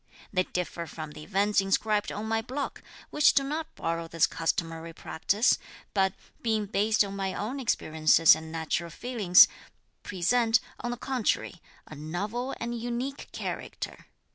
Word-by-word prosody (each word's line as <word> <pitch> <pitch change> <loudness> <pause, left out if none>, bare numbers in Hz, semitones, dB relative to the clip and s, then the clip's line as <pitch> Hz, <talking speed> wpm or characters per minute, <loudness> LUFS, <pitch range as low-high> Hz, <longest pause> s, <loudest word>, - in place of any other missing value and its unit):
They 185 - +3
differ 175 -1 -4
from 155 0 -7
the 150 - -10
events 200 +3 +2
inscribed 205 +2 +1
on 210 - -4
my 225 0 0
block, 260 +5 -4 0.3
which 295 -2 +5
do 275 - +4
not 305 +3 -4
borrow 165 0 -2
this 165 -1 +3
customary 165 0 -2
practice, 205 +9 +1 0.3
but, 190 -2 +2 0.3
being 220 -2 0
based 210 +2 +2
on 200 -1 -6
my 195 -1 -2
own 245 +7 -3
experiences 160 - +4
and 160 0 -5
natural 165 +1 -2
feelings, 205 -1 +5 0.5
present, 225 +5 +2 0.2
on 240 - -3
the 245 - -3
contrary, 240 - -1 0.2
a - - -11
novel 200 - -4
and 235 0 -3
unique 245 +4 -4
character. - - -6
205 Hz, 145 wpm, -28 LUFS, 165-235 Hz, 0.5 s, which